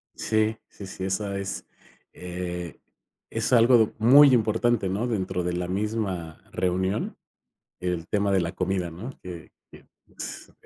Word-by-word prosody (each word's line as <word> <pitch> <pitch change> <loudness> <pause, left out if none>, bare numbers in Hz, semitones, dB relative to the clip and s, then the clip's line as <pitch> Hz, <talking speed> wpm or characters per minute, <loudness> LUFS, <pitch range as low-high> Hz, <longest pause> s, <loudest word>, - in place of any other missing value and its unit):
Sí, 110 0 +1
sí, 100 - -10
sí, 95 0 -5
esa 100 +1 -2
es 100 -1 -4 0.5
eh, 90 -2 -6 0.5
es - - -1
algo 115 -2 +6
muy 135 +5 +8
importante, 115 -2 +2
¿no? 105 +6 -1
Dentro 95 -5 -1
de 90 0 -1
la 90 0 -2
misma 95 -5 -3
reunión, 95 +3 -1 0.6
el 90 -2 -2
tema 100 -1 +1
de 95 -2 +3
la 85 0 -2
comida, 95 -2 -1
¿no? 100 +11 -7
Que 85 -3 -9 0.2
que, - - -15 0.3
s - - -7
95 Hz, 140 wpm, -26 LUFS, 90-110 Hz, 0.6 s, muy